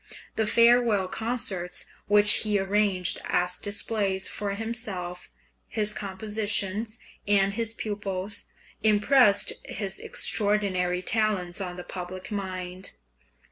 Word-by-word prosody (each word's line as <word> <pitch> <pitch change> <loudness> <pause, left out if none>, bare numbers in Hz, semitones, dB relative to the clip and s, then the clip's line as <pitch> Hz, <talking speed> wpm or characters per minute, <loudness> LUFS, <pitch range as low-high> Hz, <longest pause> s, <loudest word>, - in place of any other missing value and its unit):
The 220 -1 0
farewell 230 -4 +4
concerts 200 -5 -1 0.2
which 205 0 +7
he 210 -1 +1
arranged 195 -2 +1
as 180 0 0
displays 205 -2 -1
for 200 -1 -3
himself, 200 -6 -4 0.4
his 210 -1 0
compositions, 210 +2 -2 0.3
and 200 -1 +3
his 225 +1 -2
pupils, 205 -2 -3 0.4
impressed 210 0 +4
his 195 -2 -5
extraordinary 190 -4 +1
talents 205 -4 0
on 180 -2 -4
the 180 - -7
public 185 +1 -7
mind. 185 -2 -5
205 Hz, 100 wpm, -26 LUFS, 185-215 Hz, 0.4 s, which